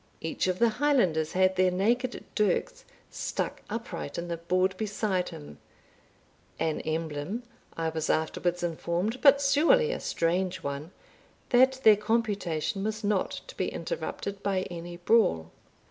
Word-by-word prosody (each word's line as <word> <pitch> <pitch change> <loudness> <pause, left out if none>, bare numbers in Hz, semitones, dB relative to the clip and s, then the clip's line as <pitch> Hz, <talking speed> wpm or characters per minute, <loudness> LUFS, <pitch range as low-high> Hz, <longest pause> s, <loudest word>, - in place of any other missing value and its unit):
Each 160 +3 -2
of 185 -1 0
the 235 +3 +4
Highlanders 185 - +2
had 185 0 +3
their 185 0 +4
naked 235 +7 0
dirks 215 - 0 0.3
stuck - - -3
upright 225 -9 -5
in 170 0 -4
the 170 - -2
board 185 +3 +1
beside 200 -3 -1
him, 75 0 -11 1.0
an 160 -1 -1
emblem, 160 +7 -3 0.3
I 165 -1 0
was 160 -1 -3
afterwards 175 +2 0
informed, 175 +7 -2
but 280 -1 +7
surely 335 - +4
a - - -3
strange 180 +1 -1
one, 140 +3 -4 0.6
that 260 +1 +5
their 215 -2 +8
computation 205 -5 -1
was 215 +1 -3
not 205 -2 0
to - - -11
be - - -1
interrupted 200 - -4
by 195 -2 0
any 175 0 -7
brawl. 175 - +2
185 Hz, 140 wpm, -28 LUFS, 165-225 Hz, 1.0 s, their